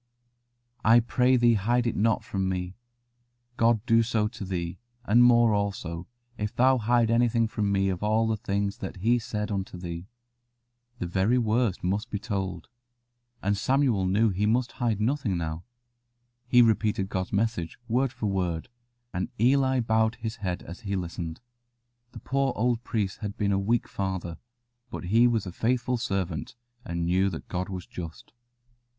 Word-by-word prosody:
"I 115 +2 +7
pray 125 +2 +2
thee 120 -1 +5
hide 120 +4 +1
it 115 - 0
not 110 +1 +2
from 95 -1 -2
me: 90 0 -3 0.8
God 115 -2 +2
do 115 -2 +5
so 110 -2 +1
to 120 -2 -8
thee, 90 -2 -4 0.3
and 120 +3 +5
more 120 -2 +5
also, 95 -5 -2 0.3
if 105 0 -3
thou 130 +1 +4
hide 115 0 +2
anything 115 -1 +3
from 105 -2 -1
me 95 0 +2
of 95 -1 -3
all 110 +2 +2
the 110 0 +1
things 100 -1 -2
that 95 - -5
He 115 +6 +2
said 110 -3 -4
unto 95 -2 -3
thee." 85 0 -6 0.9
The 90 - -3
very 95 +7 +2
worst 115 -3 +1
must 100 +6 -1
be 105 - -2
told, 95 -6 -4 0.8
and 100 +1 +2
Samuel 125 -4 +2
knew 105 +3 +3
he 100 +3 0
must 120 +3 +1
hide 115 -5 -1
nothing 115 -4 0
now. 80 0 -4 0.8
He 125 0 +6
repeated 110 -3 +1
God's 95 -1 -3
message 100 -5 -1
word 125 +2 +1
for 120 -3 -5
word, 90 -5 -1 0.4
and 90 - -2
Eli 130 +2 +3
bowed 110 0 +2
his 115 -1 -5
head 90 -5 -3
as 85 - -9
he 100 -4 -3
listened. 85 -1 -5 0.7
The - - -8
poor 135 -1 0
old 120 0 0
priest 105 -6 -2
had 105 -2 -5
been 100 -1 +1
a 95 - +2
weak 115 +4 +1
father, 95 -3 -4 0.5
but - - -6
he 115 +7 +4
was 115 -4 0
a 90 - -5
faithful 125 +5 0
servant, 95 -8 -3 0.3
and 85 -4 -3
knew 95 +3 +2
that 80 - -7
God 90 +1 -3
was 90 -2 -5
just. 85 +3 -9
105 Hz, 170 wpm, -27 LUFS, 95-120 Hz, 0.9 s, I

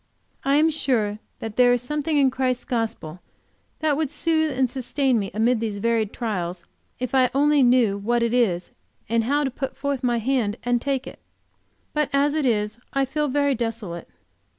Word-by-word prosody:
I 275 +1 +2
am 315 +2 +4
sure 225 -9 0 0.2
that 220 -1 -7
there 245 -1 +6
is 245 - 0
something 300 +3 -1
in 270 -2 +4
Christ's 255 -1 -1
gospel 220 -9 -3 0.6
that 310 -2 +2
would 305 -1 -1
soothe 315 +1 +1
and 260 -1 +3
sustain 260 0 0
me 195 -2 -3
amid 225 +4 +2
these 215 -2 -3
varied 225 0 0
trials, 180 -6 -4 0.3
if 255 +1 -4
I 255 -2 +4
only 290 +1 +4
knew 240 -5 +4
what 235 +3 +1
it 235 0 0
is, 190 -8 +1 0.4
and 230 0 +1
how 290 +4 +1
to 270 - -1
put 265 +1 -5
forth 280 -1 -2
my 240 -2 +1
hand 230 -3 0
and 245 0 +1
take 275 -1 -1
it. - - -10 0.7
But 300 -2 +1
as 285 +1 +3
it 305 -3 +1
is 210 -1 0
I 275 0 +1
feel 300 +3 -1
very 285 +1 +1
desolate. 225 -8 -4
250 Hz, 185 wpm, -23 LUFS, 225-280 Hz, 0.7 s, there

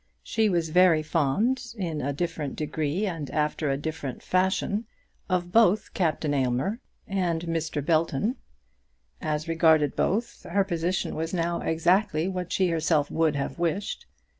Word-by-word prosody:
She 220 -2 +1
was 170 -3 0
very 175 -2 +5
fond, 210 - 0
in 165 -6 -2
a 140 - -1
different 150 -1 -3
degree 155 +5 -1
and 165 -7 -4
after 150 0 0
a 135 - +1
different 145 -3 -5
fashion, 190 +4 0 0.4
of 175 -1 0
both 215 -1 +3
Captain 160 -4 0
Aylmer 135 - 0 0.3
and 175 -4 -1
Mr. 160 -3 -2
Belton. 165 - +1 0.8
As 155 +1 -2
regarded 160 -3 +3
both, 220 +6 -1
her 200 +3 +3
position 175 -1 -1
was 160 +3 -3
now 170 0 0
exactly 175 +1 +2
what 180 -2 -4
she 185 -2 +2
herself 160 -3 +1
would 160 -2 +2
have 140 +4 -3
wished. 175 +4 -2
165 Hz, 140 wpm, -26 LUFS, 155-185 Hz, 0.8 s, very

